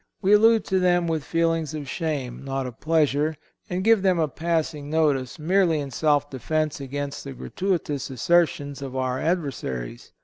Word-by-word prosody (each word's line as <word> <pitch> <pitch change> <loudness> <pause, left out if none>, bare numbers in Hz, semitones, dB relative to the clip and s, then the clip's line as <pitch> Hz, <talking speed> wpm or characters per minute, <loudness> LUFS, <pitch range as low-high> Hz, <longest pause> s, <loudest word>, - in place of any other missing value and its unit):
We 200 0 +3
allude 225 +1 +5
to 190 -1 +1
them 175 -1 +3
with 160 -3 -1
feelings 165 -1 0
of 145 -2 -5
shame, 140 -6 -3
not 135 -1 -3
of 125 -3 -8
pleasure; 155 -1 +1 0.3
and 180 +1 -2
give 225 -1 +5
them 185 -2 +3
a 160 -2 +2
passing 155 -1 -2
notice 145 -5 +1
merely 170 0 +2
in 140 -2 -5
self 145 +2 +2
defence 150 +3 -2
against 140 +1 -4
the 140 - -7
gratuitous 160 -4 -2
assertions 145 0 +1
of 135 -2 -6
our 130 0 -1
adversaries. 130 - -3
155 Hz, 165 wpm, -24 LUFS, 135-170 Hz, 0.3 s, allude